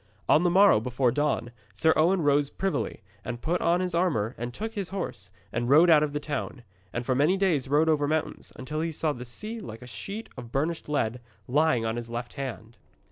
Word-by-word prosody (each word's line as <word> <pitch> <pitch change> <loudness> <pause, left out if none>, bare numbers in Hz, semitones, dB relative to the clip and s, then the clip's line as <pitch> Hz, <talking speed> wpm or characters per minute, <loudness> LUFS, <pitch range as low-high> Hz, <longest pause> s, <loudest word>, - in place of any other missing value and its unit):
On 155 - +5
the 175 - +3
morrow, 190 - +6
before 125 +2 +1
dawn, 145 -4 0 0.2
Sir 160 0 +4
Owen 175 +2 +3
rose 145 -1 +3
privily, 195 - -3 0.2
and 120 -1 -5
put 170 +7 -1
on 175 +2 +2
his 180 -1 -2
armour 145 - +1
and 120 +1 -5
took 220 - -5
his 200 -5 -4
horse, 180 - -5 0.2
and 120 +1 -1
rode 160 +5 +7
out 155 -2 +7
of 150 -1 0
the 150 - -2
town, 145 -3 -4 0.3
and 115 +3 -4
for 130 - +1
many 150 +9 +3
days 170 -9 +1
rode 150 +4 +3
over 150 -2 +2
mountains, 155 +1 -2
until 150 +4 -4
he 165 0 -1
saw 155 -1 -1
the 125 -1 -8
sea 215 - -6
like 115 - -9
a - - -9
sheet 160 - -7
of 120 -2 -9
burnished 155 +4 -2
lead 125 -4 -1 0.3
lying 140 -3 +2
on 115 +1 -1
his 120 -1 -5
left 120 +1 -5
hand. 120 -4 -6
145 Hz, 215 wpm, -27 LUFS, 120-170 Hz, 0.3 s, rode